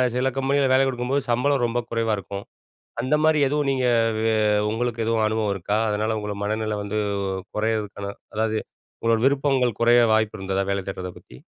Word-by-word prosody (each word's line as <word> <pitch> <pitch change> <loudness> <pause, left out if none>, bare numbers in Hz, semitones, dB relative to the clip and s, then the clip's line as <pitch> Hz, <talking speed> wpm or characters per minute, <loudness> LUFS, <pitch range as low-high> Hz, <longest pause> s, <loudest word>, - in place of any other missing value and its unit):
சில 125 +1 +1
கம்பெனிகள்ல 135 0 +2
வேல 135 +1 +5
குடுக்கும்போது 130 +2 -1
சம்பளம் 135 +2 +2
ரொம்ப 120 +1 -1
குறைவா 115 -1 0
இருக்கும். 100 +1 -7 0.6
அந்த 130 +5 +1
மாரி 155 -1 +4
எதுவும் 145 0 0
நீங்க 130 -2 0 0.4
வே 115 0 +2 0.4
உங்களுக்கு 115 +1 -1
எதுவும் 115 -1 +1
அனுபவம் 110 -2 0
இருக்கா? 100 +3 -1
அதனால 110 +1 0
உங்களோட 105 -1 -4
மனநில 110 0 -1
வந்து 100 +1 -3 0.6
குறையறதுக்கான 105 -2 -2 0.3
அதாவது 110 0 0 0.4
உங்களோட 115 -1 +2
விருப்பங்கள் 135 -4 +2
குறைய 120 +1 +6
வாய்ப்பு 110 -1 +1
இருந்ததா, 95 0 -1
வேல 100 - 0
தேடுறத 95 -1 -5
பத்தி. - - -16
115 Hz, 160 wpm, -23 LUFS, 105-130 Hz, 0.6 s, குறைய